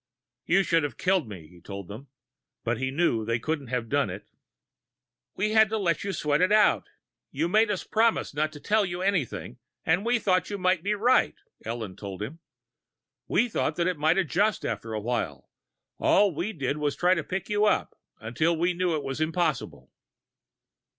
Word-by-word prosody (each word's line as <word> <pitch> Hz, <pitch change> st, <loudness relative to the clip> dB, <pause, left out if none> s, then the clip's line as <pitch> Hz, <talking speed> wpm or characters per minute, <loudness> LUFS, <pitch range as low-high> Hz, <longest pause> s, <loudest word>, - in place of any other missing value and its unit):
"You 195 Hz, +3 st, +4 dB
should 165 Hz, -3 st, +2 dB
have 145 Hz, -6 st, -4 dB
killed 185 Hz, -, +1 dB
me," 90 Hz, -6 st, -9 dB
he 90 Hz, +1 st, -18 dB
told 100 Hz, 0 st, -8 dB
them. 110 Hz, +9 st, -9 dB, 0.6 s
But 115 Hz, 0 st, -1 dB
he 130 Hz, 0 st, -1 dB
knew 140 Hz, -4 st, +1 dB
that 110 Hz, -, -5 dB
they 115 Hz, -, +2 dB
couldn't 145 Hz, +3 st, -3 dB
have 120 Hz, -1 st, -2 dB
done 140 Hz, -2 st, +1 dB
it. 95 Hz, +3 st, -8 dB, 1.1 s
"We 210 Hz, +3 st, 0 dB
had 220 Hz, -1 st, +5 dB
to 220 Hz, -, -1 dB
let 175 Hz, -6 st, 0 dB
you 200 Hz, -, -2 dB
sweat 150 Hz, -4 st, 0 dB
it 185 Hz, +2 st, +3 dB
out. 215 Hz, 0 st, +4 dB, 0.4 s
You -, -, -1 dB
made 215 Hz, +4 st, +3 dB
us 200 Hz, -3 st, -1 dB
promise 225 Hz, -5 st, +1 dB
not 155 Hz, +2 st, 0 dB
to 145 Hz, -, -10 dB
tell 215 Hz, +7 st, +2 dB
you 180 Hz, -1 st, -3 dB
anything, 150 Hz, -, -1 dB, 0.3 s
and 165 Hz, +5 st, +2 dB
we 240 Hz, +2 st, +2 dB
thought 185 Hz, -4 st, +1 dB
you 205 Hz, -, -3 dB
might 185 Hz, -2 st, +1 dB
be 205 Hz, +4 st, 0 dB
right," 240 Hz, +5 st, +3 dB, 0.3 s
Ellen 110 Hz, -4 st, -5 dB
told 100 Hz, -1 st, -6 dB
him. 150 Hz, +10 st, -7 dB, 0.9 s
"We 235 Hz, -, +2 dB
thought 185 Hz, -8 st, -1 dB
that 170 Hz, -, 0 dB
it 180 Hz, -4 st, -1 dB
might 155 Hz, +4 st, +3 dB
adjust 195 Hz, +4 st, +1 dB
after 110 Hz, 0 st, -4 dB
awhile. 115 Hz, +3 st, -3 dB, 0.5 s
All 200 Hz, -2 st, +4 dB
we 170 Hz, +8 st, -2 dB
did 140 Hz, -6 st, -2 dB
was 145 Hz, -2 st, 0 dB
to -, -, -25 dB
try 180 Hz, +1 st, +4 dB
to 165 Hz, -4 st, -1 dB
pick 190 Hz, +4 st, -4 dB
you 210 Hz, 0 st, +2 dB
up, 210 Hz, -, +1 dB, 0.2 s
until 155 Hz, +10 st, 0 dB
we 175 Hz, +2 st, +1 dB
knew 175 Hz, -1 st, 0 dB
it 150 Hz, -, -3 dB
was 135 Hz, +2 st, -4 dB
impossible." 160 Hz, -2 st, -1 dB
165 Hz, 195 wpm, -27 LUFS, 125-195 Hz, 1.1 s, had